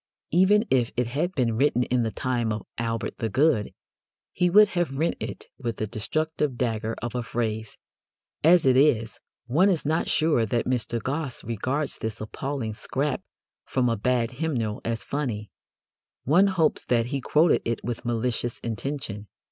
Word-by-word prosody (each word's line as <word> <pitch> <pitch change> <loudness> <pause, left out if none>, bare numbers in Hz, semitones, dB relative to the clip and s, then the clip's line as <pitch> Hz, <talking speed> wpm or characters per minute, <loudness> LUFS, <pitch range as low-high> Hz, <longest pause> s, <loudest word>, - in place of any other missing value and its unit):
Even 195 +6 +4
if 125 -3 +3
it 125 - +2
had 150 +10 -1
been 120 -4 +1
written 125 0 +3
in 125 0 +1
the 115 - 0
time 120 -1 -1
of 105 -1 -4
Albert 115 0 -3
the 115 - -1
Good, 130 -2 +2 0.6
he 180 0 +2
would 210 +3 +7
have 175 -7 -1
rent 160 +4 +1
it - - -6
with 115 -5 -3
the 110 - -1
destructive 150 +6 -2
dagger 115 -2 -1
of 120 - -3
a 125 - -1
phrase. 110 -2 -3 0.7
As 170 +1 +6
it 130 -1 +5
is, 120 -5 +3 0.3
one 160 +12 +4
is 175 -6 0
not 160 +3 0
sure 155 -7 +3
that 115 +2 0
Mr. 120 -2 -1
Gosse 135 +2 -3
regards 130 +7 -2
this 110 0 -4
appalling 115 +1 -4
scrap 135 +6 -2 0.4
from 125 -2 0
a 115 - +1
bad 120 +2 +1
hymnal 125 -6 -2
as 115 -1 -2
funny. 120 -8 -3 0.7
One 175 +9 +5
hopes 170 -6 +1
that 115 -2 +2
he 135 - -1
quoted 155 +6 +3
it 115 -1 -2
with 120 0 -4
malicious 120 0 -1
intention. 115 -3 -4
125 Hz, 165 wpm, -26 LUFS, 115-150 Hz, 0.7 s, would